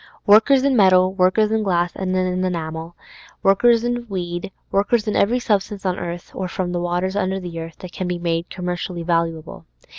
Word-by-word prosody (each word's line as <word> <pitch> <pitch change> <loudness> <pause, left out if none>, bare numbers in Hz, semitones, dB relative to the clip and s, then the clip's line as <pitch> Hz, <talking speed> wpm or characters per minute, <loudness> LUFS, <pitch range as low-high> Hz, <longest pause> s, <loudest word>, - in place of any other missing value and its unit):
Workers 225 +6 +6
in 275 -1 +2
metal, 185 -3 +5
workers 195 +3 +2
in 220 0 +1
glass 175 -4 +1
and 185 -1 -2
in 185 0 0
enamel, 165 -2 -4 0.5
workers 230 +4 +4
in 240 0 -2
weed, 175 -1 -4 0.2
workers 210 +3 +1
in 210 - 0
every 230 +5 +3
substance 205 -3 -1
on 185 -1 -1
earth, 175 0 -6
or 190 - -3
from 180 0 -3
the 175 -1 -2
waters 175 +2 -1
under 190 -1 -1
the 175 -2 -6
earth, 165 -1 -8
that 185 - -8
can 185 - -4
be 180 0 -2
made 170 -1 -2
commercially 180 -1 -4
valuable. 165 - -2
185 Hz, 185 wpm, -21 LUFS, 175-205 Hz, 0.5 s, Workers